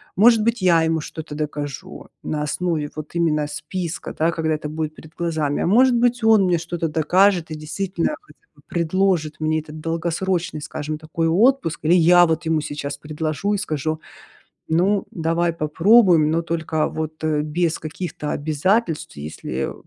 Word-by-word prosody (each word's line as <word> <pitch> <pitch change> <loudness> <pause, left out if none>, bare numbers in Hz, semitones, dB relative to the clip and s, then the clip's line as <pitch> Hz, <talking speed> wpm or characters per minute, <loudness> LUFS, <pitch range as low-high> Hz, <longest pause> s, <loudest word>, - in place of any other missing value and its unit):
может 225 +2 +5
быть 230 0 0
я 175 -3 +4
ему 160 0 +1
что-то 155 0 -8
докажу 145 -2 -5
на 150 - -2
основе 155 -1 -1
вот 155 +2 -8
именно 155 -3 +1
списка 165 +3 -5
да, 165 +2 +1
когда 160 -1 -1
это 150 0 -5
будет 155 0 -3
перед 155 0 -14
глазами. 160 -4 -1
А - - 0
может 245 +6 +5
быть 240 0 +1
он 220 -3 +6
мне 180 -1 +2
что-то 165 0 -3
докажет, 175 +2 +2
и - - -3
действительно 170 - -2
хотя 415 - -21 0.2
бы - - -21
предложит 170 -2 0
мне 155 0 +1
этот 155 0 -10
долгосрочный, 170 +1 -2
скажем 155 0 -5
такой 160 +1 -2
отпуск. 215 - +2
Или 160 +3 +4
я 175 +1 +6
вот 160 -1 -1
ему 160 -1 +1
сейчас 145 -1 -5
предложу 155 +6 -2
и - - -1
скажу: 155 -4 -3 0.7
"Ну 190 +5 +2
давай 165 +1 0
попробуем, 165 +1 +4
но 165 +1 +1
только 160 -2 -1
вот, 155 0 -5
э, 155 -1 +1
без 160 +2 -1
каких-то 155 -1 -5
обязательств." 160 - 0
И - - -7
если, 75 -3 -7 0.2
э, - - -7
160 Hz, 170 wpm, -21 LUFS, 155-180 Hz, 0.7 s, он